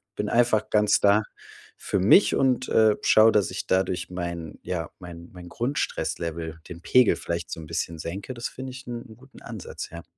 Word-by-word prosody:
bin 105 - -2
einfach 120 -3 +2
ganz 105 -1 +3
da 105 +1 +4 0.5
für 100 - -2
mich 105 - +5
und, 130 -1 +1
äh, 110 -1 +4
schaue, 110 +1 +6
dass 105 -3 +2
ich - - -5
dadurch 95 -1 0
mein 85 -3 -5
ja, 85 -3 -4
mein 85 -1 -10
mein 90 -1 -11
Grundstress-Level, 85 - -3
den 85 0 -9
Pegel 125 +3 +4
vielleicht 85 0 -4
so - - -5
‘n 80 - -8
bisschen 85 0 -3
senke.“ 95 +10 -6
Das 120 - -4
finde 130 0 -8
ich 130 +1 -10
'n 120 -1 -5
'n 110 - -14
guten 130 +1 -17
Ansatz, 110 -6 -8
ja. 85 0 -9
100 Hz, 190 wpm, -25 LUFS, 85-120 Hz, 0.5 s, schaue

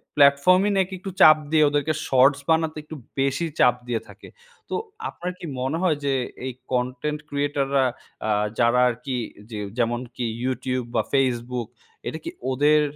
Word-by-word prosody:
Platform 145 +6 +5
নাকি 190 0 +1
একটু 195 +1 -6
চাপ 155 0 +9
দিয়ে 155 -1 +5
ওদেরকে 145 +2 0
শর্টস 135 +2 +4
বানাতে 160 -1 +2 0.4
বেশি 140 +4 +1
চাপ 125 - +5
দিয়ে 120 -2 -1
থাকে। - - -13 0.4
তো - - -2 0.3
আপনার 180 +1 -5
কি - - -7
মনে 135 +5 -1
হয় 165 -5 +2
যে, 140 - +2 0.3
এই 130 - -3 0.2
কনটেন্ট 125 +4 -1
ক্রিয়েটররা 140 -1 +1 0.4
আ - - 0 0.3
যারা 120 +1 +4
আর 120 - -2
কি 135 -2 -2 0.3
যে 110 -3 -5 0.2
যেমনকি 120 +1 -2 0.2
YouTube 130 -1 -2
বা 115 - +4
Facebook 125 -3 0 0.4
এটা - - -3
কি 335 - -4 0.2
ওদের 150 +3 +4
135 Hz, 155 wpm, -24 LUFS, 125-150 Hz, 0.4 s, চাপ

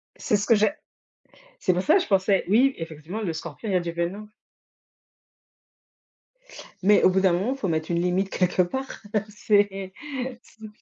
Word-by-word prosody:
C'est 210 - 0
ce 205 - -3
que 230 - +6
j'a 215 +7 +2 0.9
c'est 185 - +2
pour 180 - 0
ça 310 - +4
que 385 - +4
je - - -5
pensais 195 0 +2
oui 260 +6 +4
effectivement, 165 +5 -6
le 175 -6 -2
scorpion 165 +6 -7
il - - -1
y - - +2
a 180 - +4
du 170 -1 -4
venin. 175 +5 -3 2.6
Mais 205 +2 +5
au - - +7
bout 190 +1 +2
d'un 190 -2 +4
moment, 200 +10 0
il - - -8
faut 200 - -2
mettre 160 -1 -2
une 170 - +1
limite 185 +2 0
quelque 180 0 +1
part, 265 +10 -4 0.3
c'est 200 -2 0 0.5
c'est 220 0 -13
195 Hz, 185 wpm, -25 LUFS, 175-215 Hz, 2.6 s, au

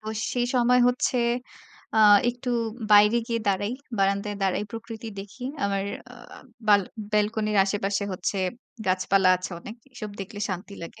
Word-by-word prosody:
তো 215 - -15 0.3
সেই 245 -1 0
সময় 250 0 +4
হচ্ছে 250 +1 0 0.8
আ - - +4 0.3
একটু 245 +1 -8 0.4
বাইরে 210 +2 +7
গিয়ে 230 -1 -1
দাঁড়াই। 200 +3 0 0.3
বারান্দায় 200 +1 0
দাঁড়াই 195 +2 +1
প্রকৃতি 230 0 -7
দেখি। 205 +6 -12 0.2
আমার 195 -1 0 0.3
আ - - -11 0.5
বাআল 205 -1 +6 0.3
ব্যালকনির 210 0 +1
আশেপাশে 200 0 -1
হচ্ছে 185 +2 -2 0.5
গাছ-পালা 185 +1 +3
আছে 185 +1 -7
অনেক। 215 - -9 0.2
এসব 215 -4 -7
দেখলে 205 +2 -7
শান্তি 185 +2 -6
লাগে। 165 - -9
205 Hz, 140 wpm, -25 LUFS, 195-230 Hz, 0.8 s, বাইরে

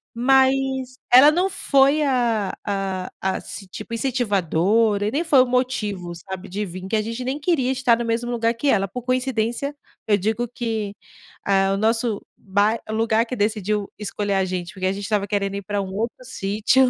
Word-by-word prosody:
Mas 265 +1 +2 0.2
ela 270 +4 +9
não 360 +5 +1
foi 280 -3 +3
a 235 -7 +1
a 195 -2 -2
ass 190 +1 -4
tipo 230 - -7
incentivadora 210 - +1
e - - -1
nem 300 +7 0
foi 290 -6 +5
o - - -2
motivo, 215 -8 -1
sabe, 190 +2 -8
de 205 +3 -3
vim. 185 0 -8
Porque 190 +4 -2
a 215 - +2
gente 230 +3 -4
nem 265 +4 -2
queria 290 -5 +1
estar 260 -2 +3
no 240 - -2
mesmo 230 +1 -1
lugar 230 -1 +1
que 235 +5 -2
ela. 195 -4 +2
Por 250 +6 -7
coincidência, 255 +1 -1 0.3
eu 205 -2 +4
digo 220 +5 -1
que, 225 -4 -3 0.5
eh, 195 -1 +3
o 195 - 0
nosso 225 0 +1 0.2
bai 205 +3 +1
lugar 225 +1 +2
que 255 - -5
decidiu 210 -1 0
escolher 205 -1 -2
a 190 -1 +2
gente, 180 -1 -4
porque 185 -1 -2
a - - +2
gente 200 +1 -5
estava 205 -1 0
querendo 200 0 -1
ir 200 - -3
para 205 +2 -2
um 190 -1 -6
outro 230 +5 -3
sítio, 225 +3 +2
220 Hz, 190 wpm, -22 LUFS, 200-255 Hz, 0.5 s, ela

